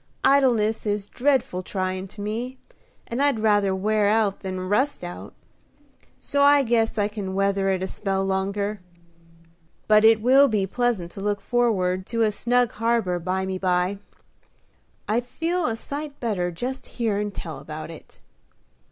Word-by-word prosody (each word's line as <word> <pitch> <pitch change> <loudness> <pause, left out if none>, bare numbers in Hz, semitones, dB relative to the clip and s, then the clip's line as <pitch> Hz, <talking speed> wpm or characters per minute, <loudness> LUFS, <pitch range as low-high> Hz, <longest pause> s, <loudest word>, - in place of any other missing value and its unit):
Idleness 235 -6 +3
is 205 -1 -1
dreadful 250 -6 0
tryin' 185 0 -3
to 205 +2 -11
me, 235 +5 -4 0.5
and 235 +3 -3
I'd 285 -5 +2
rather 205 -3 +2
wear 210 +2 +1
out 210 -2 +1
than 185 -1 -5
rust 260 +5 0
out; 175 0 -8 0.8
so 285 - -1
I 285 0 +6
guess 225 -2 +1
I 205 -1 +2
can 205 -3 -5
weather 195 0 +1
it 190 -1 0
a - - 0
spell 195 0 -2
longer. 200 +2 -1 1.1
But 215 0 +5
it 220 0 +6
will 265 +5 +6
be 210 -6 +1
pleasant 210 -5 -1
to 195 - -8
look 205 0 -1
forrard 195 -5 0
to 230 -1 0
a 215 - +2
snug 245 +2 +1
harbor 225 -6 0
bymeby. 185 +1 -1 1.1
I 215 +3 +2
feel 330 +7 -2
a 225 - -1
sight 285 +4 -6
better 200 -7 -1
just 250 +10 -5
hearin' 210 -3 0
tell 160 -7 -7
about 155 +3 -7
it." 160 - -14
210 Hz, 150 wpm, -24 LUFS, 190-240 Hz, 1.1 s, I